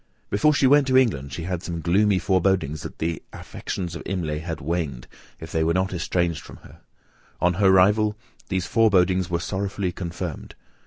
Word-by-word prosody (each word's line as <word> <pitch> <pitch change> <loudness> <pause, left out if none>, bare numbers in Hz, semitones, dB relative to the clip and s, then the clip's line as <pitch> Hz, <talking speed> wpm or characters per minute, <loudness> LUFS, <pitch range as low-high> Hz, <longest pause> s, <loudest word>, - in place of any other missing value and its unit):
Before 105 +10 +4
she 140 - +2
went 140 +1 +5
to 130 -1 +4
England, 70 - +1
she 85 - -5
had 90 -1 -3
some 85 -2 -5
gloomy 95 +4 +3
forebodings 90 -5 +1
that - - -8
the 80 0 -2
affections 85 -3 -6
of - - -6
Imlay, 80 -5 -2
had 80 0 -5
waned, 80 -5 -3 0.3
if 80 - -9
they 80 - +1
were 85 +2 +1
not 95 +1 0
estranged 85 -1 -1
from - - -12
her; - - -15 0.6
on 90 0 +2
her 100 - +5
arrival, 105 +3 +4 0.3
those 95 -2 -1
forebodings 95 -3 +3
were 85 -1 0
sorrowfully 95 0 -2
confirmed. 85 -2 -6
90 Hz, 175 wpm, -24 LUFS, 85-100 Hz, 0.6 s, went